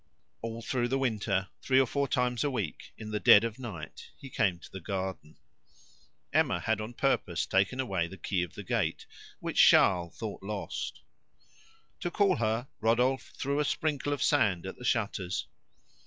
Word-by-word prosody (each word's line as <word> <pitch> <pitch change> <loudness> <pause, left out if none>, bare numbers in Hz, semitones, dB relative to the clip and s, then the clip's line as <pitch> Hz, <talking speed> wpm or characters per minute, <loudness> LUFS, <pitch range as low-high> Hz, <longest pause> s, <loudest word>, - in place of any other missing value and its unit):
All 115 0 -5
through 120 -1 0
the 135 +2 0
winter, 110 -7 0
three 130 0 +3
or 135 - +5
four 140 +3 -1
times 125 0 0
a 145 - +1
week, 120 - -4
in 110 -1 -7
the 105 - -1
dead 100 - +8
of 115 +1 -3
night 90 - -8
he 135 - -11
came 100 -7 +1
to - - -14
the 95 - -7
garden. 95 -4 -4 1.0
Emma - - +3
had 110 -1 0
on 110 +3 -7
purpose 95 -10 +1
taken 100 +7 +1
away 95 -10 0
the 95 +3 -10
key 90 0 -1
of 90 -3 -5
the - - -7
gate, - - -1 0.4
which - - -2
Charles 85 -3 +5
thought 110 -3 -5
lost. 100 +1 -5 1.0
To 175 - -2
call 195 0 +2
her, 115 +2 0
Rodolphe 125 +4 +1
threw 140 +2 -1
a - - +3
sprinkle 145 -1 -1
of 145 - 0
sand 105 - +2
at 95 - -6
the - - -11
shutters. 100 -6 -1
115 Hz, 175 wpm, -30 LUFS, 95-130 Hz, 1.0 s, dead